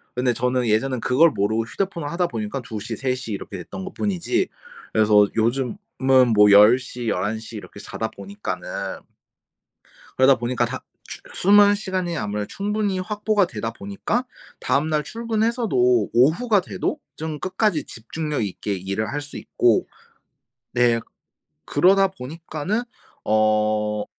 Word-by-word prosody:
근데 125 0 +1
저는 125 +1 0
예전엔 125 +4 +1
그걸 155 +6 +4
모르고 110 0 0
휴대폰을 170 +1 -3
하다 175 +3 0
보니까 115 0 -4
2 110 -2 -6
시, 115 +2 -5
3 130 +2 -1
시 125 -3 -7
이렇게 100 0 -6
됐던 190 - -8
것뿐이지. 205 - -1 0.5
그래서 105 -2 +5
요즘은 120 +2 0 0.6
뭐 105 0 +7
10 105 +4 +8
시 125 -2 -7
11 105 +2 -1
시 110 +1 -10
이렇게 105 -1 -9
자다 110 +2 -4
보니까는 205 - -6 1.5
그러다 130 0 +6
보니까 120 +1 -1
다 - - -4 0.3
추 - - -9
수면 205 +2 +6
시간이 185 -4 -3
아무래도 105 -4 -3
충분히 205 - -2
확보가 210 +1 +1
되다 115 -6 -5
보니까 205 - -2 0.3
다음날 150 +1 0
출근해서도 220 - +1
오후가 175 - +4
돼도 300 - -3 0.2
좀 155 -1 -5
끝까지 190 -3 0
집중력 150 +4 -4
있게 100 0 -3
일을 100 +3 -3
할 145 - -2
수 145 0 -9
있고 120 -3 +1 0.9
네 120 -1 +3 0.6
그러다 195 +6 +4
보니까는 165 - -4 0.4
어 105 -1 +1
130 Hz, 285 characters per minute, -22 LUFS, -, 1.5 s, 10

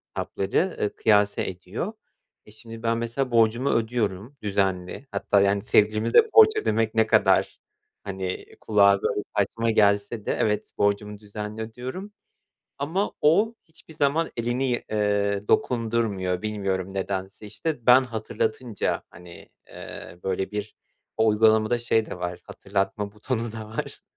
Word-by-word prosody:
hesapları, 135 - -1
eee, 105 - +1
kıyas 105 -2 +3
ediyor. 95 - -5 0.5
E, - - -16
şimdi 115 +1 -11
ben, 115 0 +1
mesela, 120 +3 -2
borcumu 115 +3 +3
ödüyorum 115 +1 -1
düzenli. 95 +3 -1
Hatta, 100 - +2
yani, 100 0 +2
sevgilime 110 +2 +2
de 450 - +6
borç 435 -1 +8
ödemek 115 - 0
ne 110 0 +3
kadar, - - +3 0.4
hani, 95 -2 -4 0.2
kulağa, 100 -2 +4
böyle, 105 - 0 0.2
saçma 115 +3 +1
gelse 105 0 +2
de - - -1
evet 105 -1 -1
borcumu 105 0 0
düzenli 105 +1 -7
ödüyorum. 130 - -7 0.7
Ama 165 +9 -1
o 205 +10 +3
hiçbir 160 0 -17
zaman 155 +2 +1
elini, 120 +3 -1
iii, 120 - -1 0.6
dokundurmuyor. 110 -6 0
Bilmiyorum 95 -3 -2
nedense, 95 +1 -4
işte. 140 +3 -4
Ben 125 +1 +8
hatırlatınca, 110 -1 -2
hani, 85 0 -14 0.2
eee, 85 - -10
böyle, 95 0 -1
bir 105 0 -5 0.4
O 110 0 +4
uygulamada 110 +2 +3
şey 115 -2 +1
de - - -7
var 90 0 -4
hatırlatma 100 +1 -3
butonu 115 +1 -3
da 110 -1 -7
var. 110 - -6
110 Hz, 135 wpm, -25 LUFS, 100-120 Hz, 0.7 s, borç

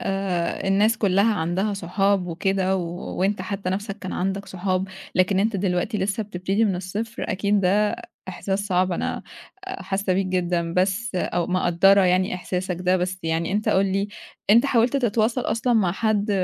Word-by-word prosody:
آآ 195 -3 -2
الناس 210 +4 +3
كلها 200 +2 +3
عندها 180 +5 -1
صحاب 195 +1 0
وكده 190 +2 0
وأنت 185 +2 -2
حتى 195 -1 -3
نفسك 200 +2 -4
كان 185 -2 -6
عندك 195 +2 -2
صحاب 185 +1 -2 0.3
لكن 185 +1 +3
أنت 215 +1 +1
دلوقتي 185 +3 -1
لسّه 195 +3 -1
بتبتدي 195 +2 -1
من 195 -4 +1
الصفر، 210 +6 -4
أكيد 200 +1 +1
ده 205 +3 +2 0.3
إحساس 195 +2 -2
صعب 185 -1 +1
أنا - - -2 0.4
حاسّة 195 - -2
بيك 190 +1 +1
جدًا، 175 -2 -1
بس 195 +5 0
أو 175 -1 -1
مقدرة 185 +2 +4
يعني 185 +1 +2
إحساسك 180 0 -3
ده 180 +1 +2
بس 185 +1 -2
يعني 165 +2 -1
أنت 210 +1 0
قُل 195 +1 +3
لي 195 +2 -1 0.4
أنت 235 +6 +6
حاولت 245 +1 +2
تتواصل 235 -1 +1
أصلًا 230 +1 0
مع 200 -7 +3
حد 210 +1 0
195 Hz, 160 wpm, -23 LUFS, 180-205 Hz, 0.4 s, أنت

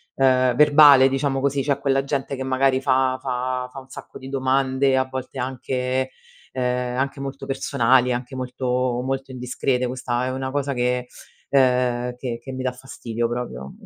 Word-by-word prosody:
ehm, 130 -2 +3
verbale 145 -2 +7
diciamo 135 0 0
così. 140 0 0
C'è 140 0 0
quella 135 -1 +1
gente 140 0 -2
che 130 - -7
magari 130 0 +1
fa 130 0 +2
fa 125 0 -2
fa - - -13
un 130 0 -10
sacco - - -10
di 130 - -10
domande, 135 0 +1
a 130 - +2
volte 130 0 -7
anche, 130 0 -2 0.4
ehm, 125 -1 -1
anche 135 +1 -2
molto 135 0 -6
personali, 130 -2 +2
anche 125 +1 -4
molto 125 -1 -1
molto 135 0 -3
indiscrete, 125 0 -1
questa 125 0 -2
è 130 - -2
una 130 0 -3
cosa 140 0 -1
che, 125 0 0 0.4
ehm, 125 -2 +2
che 125 -2 -5
che 130 - -8
mi 130 0 -4
dà 130 - 0
fastidio 120 -2 -4
proprio 70 - -5
130 Hz, 170 wpm, -22 LUFS, 125-135 Hz, 0.4 s, verbale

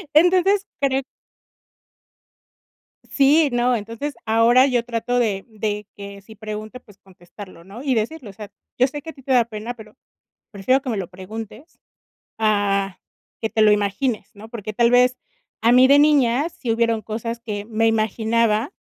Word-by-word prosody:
Entonces 370 +5 +4
creo 270 -1 +1 2.1
Sí, 290 +2 +4
no, 245 +1 +2
entonces 230 +6 -5
ahora 230 +3 +5
yo 250 -4 +1
trato 245 +1 -1
de 205 -5 -1
de 210 -1 -4
que 200 0 -10
si 220 +3 -15
pregunte, 215 +3 -7
pues, 205 -4 -20
contestarlo, 185 0 -14
¿no? 200 +8 -11
Y 270 -3 +1
decirlo, 230 +2 -3
o - - -11
sea, 205 0 -10 0.3
yo 255 +2 +4
sé 290 +2 -7
que 320 - -10
a - - -8
ti 270 - -16
te 265 - 0
da 245 -2 +5
pena, 225 +1 -6
pero 220 -1 -15 0.5
prefiero 255 +6 +1
que 265 - -6
me 220 - -2
lo 185 -2 -4
preguntes 215 - -10 0.6
a 200 -3 0 0.4
que 220 - -2
te 220 - -1
lo 210 -1 +6
imagines, 210 +4 -1
¿no? 215 +2 -12
Porque 215 -3 -7
tal 235 +2 +3
vez 250 +1 +4 0.4
a 230 +2 +4
mí 255 +1 +6
de 280 +1 +6
niñas 290 0 +3
sí 245 - -4
hubieron 225 -1 +1
cosas 230 +2 -5
que 210 -3 -5
me 225 +1 0
imaginaba 225 - +1
230 Hz, 170 wpm, -21 LUFS, 210-255 Hz, 2.1 s, lo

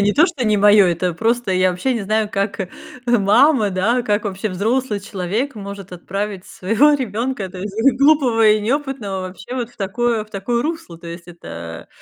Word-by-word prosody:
не 205 +1 +3
то, 315 +4 +5
что 315 -8 -3
не 215 -2 +3
моё, 205 -1 +6
это 175 0 -1
просто, 230 +1 0
я 185 0 +3
вообще 180 +9 -1
не 230 - -2
знаю, 215 +1 0
как, 200 +1 -2
э, 195 - -2 0.4
мама, 235 +2 +4
да, 215 +7 +1
как 210 -2 0
вообще 200 +1 -3
взрослый 215 +4 -1
человек 200 +7 -3
может 200 -2 -8
отправить 195 +2 -4
своего 225 +11 +2
ребенка, 235 -4 -2
то 185 - -10
есть, 200 +2 -5 0.3
глупого 260 -7 +4
и 210 0 +4
неопытного, 245 -5 -2
вообще 185 +7 -7
вот 245 -2 -3
в - - -25
такое 220 +2 -1
в 215 - -24
такое 235 +5 -1
русло? 315 - -5
То 170 - -12
есть, 170 +1 -9
это 85 - -9
210 Hz, 190 wpm, -19 LUFS, 190-240 Hz, 0.4 s, моё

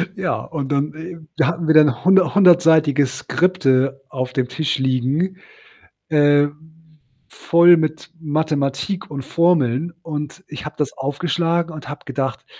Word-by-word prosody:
Ja, 190 -4 -2
und 145 -3 -5
und, 140 +2 -1
äh, 165 +2 -8 0.2
da - - +2
hatten 165 +1 -3
wir 160 - +4
dann 150 -6 +4
hunder 190 0 +4
hundertseitige 165 -6 +4
Skripte 135 -2 0
auf 130 -1 -4
dem 130 -1 -1
Tisch 150 +4 -2
liegen, 135 +8 -1 0.7
äh, 145 -1 +4 0.8
voll 170 +1 +4
mit 155 0 -3
Mathematik 155 +2 -2
und 140 -2 -6
Formeln 165 -2 +1
und 150 +3 -6
ich 150 - -9
habe 150 0 -7
das 150 -2 -2
aufgeschlagen 165 +4 -2
und 150 -4 -9
habe 145 -1 -9
gedacht: 135 -2 -4
150 Hz, 140 wpm, -19 LUFS, 135-170 Hz, 0.8 s, wir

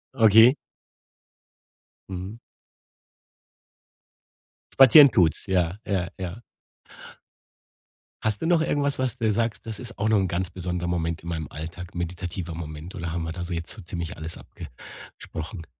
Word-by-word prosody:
Okay. 115 +3 +7 1.5
Mhm. 95 +5 -6 2.4
Spazieren 135 +1 +10
tut's, 85 -6 +2
ja, 90 -1 0
ja, 90 -3 -1
ja. 95 +4 -6 1.8
Hast 110 -2 -1
du 165 - 0
noch 170 -2 +4
irgendwas, 140 -3 0
was 130 -2 -1
dir 110 -3 +1
sagst: 115 -3 -1
„Das 110 -2 -4
ist 120 -2 -8
auch 110 +2 0
noch 110 - +4
'n 95 -1 +1
ganz 90 +1 -2
besonderer 90 0 -3
Moment 85 -1 -2
in 85 - -6
meinem 80 -4 -3
Alltag, 85 +3 -8
meditativer 85 0 -4
Moment“, 80 +1 -7
oder 85 -2 -4
haben 85 -1 -2
wir 80 - -4
da 90 0 -5
so 90 - -4
jetzt 85 0 -4
so - - -8
ziemlich 85 -1 -6
alles 80 +1 -6
abgesprochen? 80 - -10
90 Hz, 140 wpm, -25 LUFS, 85-110 Hz, 2.4 s, Spazieren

